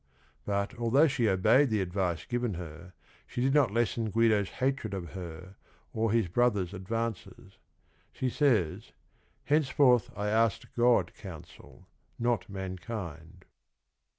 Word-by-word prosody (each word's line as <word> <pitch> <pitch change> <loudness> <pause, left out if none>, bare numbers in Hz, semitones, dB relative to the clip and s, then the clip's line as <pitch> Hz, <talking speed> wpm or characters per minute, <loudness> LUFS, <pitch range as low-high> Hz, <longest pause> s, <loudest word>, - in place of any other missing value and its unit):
But 100 +3 -1
although 120 +6 +4
she 120 -6 +1
obeyed 110 +9 +4
the 110 -2 +1
advice 90 -3 -2
given 120 -4 -2
her 85 +1 -9 0.3
she - - -6
did 135 +2 +2
not 145 -6 +4
lessen 115 +1 0
Guido's 110 -2 +2
hatred 130 -6 -2
of 85 -3 -6
her 90 +1 -9 0.4
or 110 -1 0
his 115 -4 +2
brother's 100 -2 +1
advances. 100 -1 -5 0.5
She 130 - -3
says: 120 - +1 0.2
" - - -39
Hence 150 -1 +2
forth 125 -3 +4
I 105 0 -1
asked 110 0 +1
God 120 -7 +3
counsel 90 -7 -12 0.3
not 120 -2 0
mankind." 95 -3 -7
110 Hz, 130 wpm, -29 LUFS, 95-120 Hz, 0.5 s, although